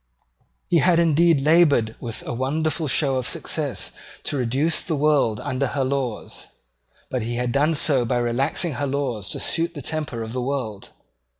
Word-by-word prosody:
He 170 - +4
had 175 +2 +4
indeed 165 -2 +4
laboured 145 -7 +4
with 115 -2 -5
a - - -3
wonderful 155 +5 -1
show 135 0 +2
of 130 - -1
success - - -1 0.3
to - - -2
reduce 135 +6 0
the 165 - -2
world 145 -7 +2
under 135 -1 -1
her 135 +1 -1
laws; 130 -4 -3 0.6
but 130 - -1
he 120 +2 -3
had 125 0 -1
done 150 +5 +2
so 140 -3 +3
by 120 +1 0
relaxing 135 +8 0
her 145 - 0
laws 130 -7 -2
to - - -3
suit 170 +1 0
the 145 - -7
temper 145 -5 -3
of 110 +1 -6
the 125 - -2
world. 125 -6 -3
140 Hz, 175 wpm, -23 LUFS, 120-155 Hz, 0.6 s, He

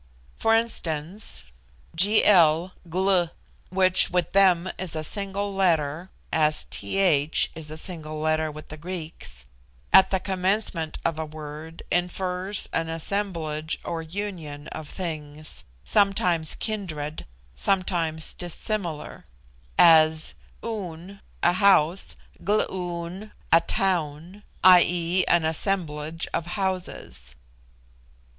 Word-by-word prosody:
For 225 - +3
instance, 185 -4 -2 0.5
Gl 180 -3 +5 1.0
(which 185 0 +4
with 180 -2 0
them 185 -2 +4
is 180 -3 -5
a 155 - -2
single 200 +3 -3
letter, 170 -3 +1 0.2
as 155 -1 +2
'th' 160 -6 +2
is 160 -2 -9
a 155 - -6
single 155 -3 -6
letter 155 0 +1
with 155 0 -10
the 155 - -8
Greeks) 160 - -7 0.5
at 190 0 +8
the 190 - +1
commencement 185 -3 0
of 165 -1 0
a 160 - -2
word 155 +1 -9
infers 180 +2 -1
an 165 0 -1
assemblage 165 -3 -2
or 165 -1 -3
union 165 -5 -6
of 155 -2 -8
things, 155 - -5 0.2
sometimes 180 - +2
kindred, 160 - -4 0.3
sometimes 165 - 0
dissimilar 175 -2 -4 0.5
as 160 -2 +6 0.3
Oon, 195 -3 -6 0.2
a 175 - +5
house; 185 -2 +3 0.3
Gloon, 185 -1 -2 0.2
a 165 - +7
town 175 0 -1 0.2
(i. 185 -1 +9
e., 175 +1 +1
an 170 -2 +3
assemblage 160 -2 -2
of 170 - -2
houses). 180 - -4
170 Hz, 105 wpm, -25 LUFS, 155-190 Hz, 1.0 s, i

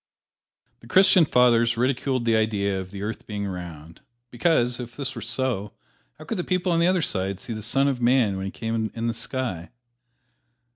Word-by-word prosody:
The - - -16
Christian 185 -2 +5
Fathers 120 -3 +3
ridiculed 130 0 0
the 115 -1 +3
idea 100 -3 0
of 95 - -9
the 100 +1 -7
earth 110 +2 -5
being 105 -1 -4
round, 85 -4 -8 0.3
because, 125 -2 +1
if 120 -1 -7
this 135 -2 -4
were 115 - -7
so, 115 -3 -1 0.4
how 155 - -11
could 195 +4 -3
the - - -1
people 185 0 0
on 165 - +2
the 170 - +3
other 185 -2 +2
side 95 -4 -2
see 115 - -7
the 110 - -6
Son 135 +6 +1
of 130 -3 -1
Man 120 -4 +3
when 95 0 -4
He - - -5
came 115 -1 -2
in 115 0 -3
the 115 - 0
sky? 115 -7 -4
115 Hz, 195 wpm, -24 LUFS, 100-130 Hz, 0.4 s, Christian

